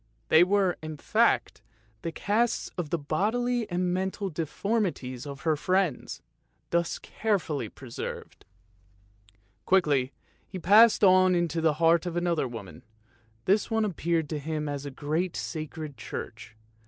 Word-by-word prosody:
They 160 - +7
were, 190 -1 +2
in 155 -1 -6
fact, - - +1 0.4
the 165 - -3
casts 220 +7 0
of 175 -5 -4
the 170 - 0
bodily 220 +10 -1
and 180 0 0
mental 190 +1 -2
deformities 160 - -2
of 140 -1 -8
her 160 0 +2
friends, 185 -2 -1 0.5
thus 170 0 0
carefully 160 - -2
preserved. 120 0 -8 1.2
Quickly 145 -9 +3 0.4
he 190 - -7
passed 210 +5 +6
on 185 -1 +6
into 170 -2 0
the 160 -1 +3
heart 165 +2 +3
of 175 0 -3
another 170 -5 0
woman; 100 -10 -9 0.6
this 200 +3 +2
one 220 -1 +1
appeared 170 -4 -1
to 155 - -3
him 150 +1 -3
as 145 0 -4
a - - -3
great 155 +6 -2
sacred 155 -2 -6
church. 110 0 -7
170 Hz, 135 wpm, -28 LUFS, 150-190 Hz, 1.2 s, They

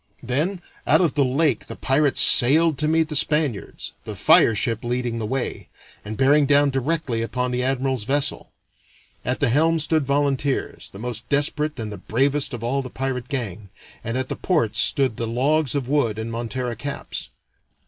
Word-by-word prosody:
Then 160 +10 -2 0.2
out - - +5
of 170 -6 +2
the 145 - +2
lake 135 0 0
the - - -7
pirates 140 +1 +1
sailed 150 +3 +4
to 150 - +1
meet 160 0 +2
the 150 - -4
Spaniards, 150 -7 -1
the - - -7
fire 115 - +5
ship 115 0 -1
leading 120 -1 -2
the 110 - -3
way, 130 +2 -3 0.3
and 105 +1 -6
bearing 140 +2 +4
down 145 0 +4
directly 135 -3 -1
upon 125 +2 -2
the 125 0 -1
admiral's 130 -2 -1
vessel. 140 +2 -1 0.7
At 125 +2 -2
the 145 - +2
helm 160 +6 +3
stood 160 0 +1
volunteers, 140 0 -1
the - - -12
most 120 +1 -5
desperate 150 0 0
and 110 -2 -4
the 105 - -8
bravest 140 +5 0
of 120 -3 -6
all 135 +4 0
the 130 - -7
pirate 130 -1 -4
gang, 110 -7 -4 0.3
and 115 +3 -3
at 130 0 -2
the - - -4
ports 120 - 0
stood 135 -5 +2
the 115 - -2
logs 140 +4 +1
of 135 -3 -2
wood 130 -7 +1
in 110 +1 -4
montera 120 +1 -3
caps. 140 +2 -6
135 Hz, 180 wpm, -22 LUFS, 120-145 Hz, 0.7 s, out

